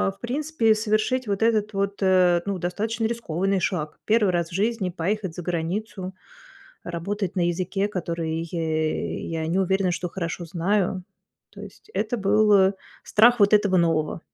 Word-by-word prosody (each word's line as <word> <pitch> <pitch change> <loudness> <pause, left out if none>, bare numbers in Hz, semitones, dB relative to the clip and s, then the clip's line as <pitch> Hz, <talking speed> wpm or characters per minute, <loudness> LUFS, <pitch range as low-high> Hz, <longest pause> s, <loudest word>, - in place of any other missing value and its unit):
в - - -30
принципе 245 -3 +1
совершить 215 +3 0
вот 200 0 -1
этот 215 -2 +2
вот, 200 +1 -2
э, 180 -2 +4
ну, 200 -2 -2
достаточно 220 +6 -2
рискованный 195 -4 -1
шаг. 155 -5 -2
1 215 -2 +3
раз 170 -1 -1
в - - -13
жизни 205 0 0
поехать 190 +1 -2
за 180 - -5
границу, 185 +3 -3 0.7
работать 185 +3 -4
на 175 - +2
языке, 185 +3 -1
который 165 -4 -3
е 160 -2 -2
я 160 -1 -3
не 170 +4 0
уверена, 190 -1 +1
что 180 +1 -3
хорошо 170 -1 -4
знаю. 185 +2 0 0.5
То - - -13
есть - - -13
это 220 +3 -1
был, 210 0 +3
э, 190 -1 +5 0.3
страх 240 +2 +5
вот 200 0 +5
этого 205 -3 +4
нового. 165 -3 +1
195 Hz, 160 wpm, -24 LUFS, 175-215 Hz, 0.7 s, э